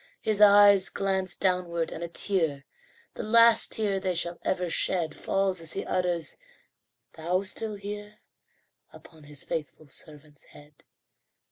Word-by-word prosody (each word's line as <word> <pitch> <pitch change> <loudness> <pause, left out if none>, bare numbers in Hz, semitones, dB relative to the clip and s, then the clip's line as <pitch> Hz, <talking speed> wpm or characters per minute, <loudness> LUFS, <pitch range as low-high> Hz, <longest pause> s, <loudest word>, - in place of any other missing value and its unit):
His 210 -1 0
eyes 205 -1 +6
glance 190 -2 -1
downward, 180 -3 -1
and 165 - -7
a - - -4
tear 165 -6 -2 0.5
The - - -7
last 230 +1 +5
tear 205 -3 -1
they 185 -2 -2
shall 170 0 -2
ever 180 -1 -1
shed 165 -1 -1
Falls 195 -2 -1
as 165 -1 -6
he - - -5
utters, 175 - -2 0.7
"Thou 175 +4 -2
still 215 +2 -4
here!" 205 +1 -8 0.7
Upon 160 -3 -17
his 145 -1 -9
faithful 155 0 -6
servant's 150 0 -13
head. 145 0 -19
180 Hz, 135 wpm, -27 LUFS, 160-200 Hz, 0.7 s, eyes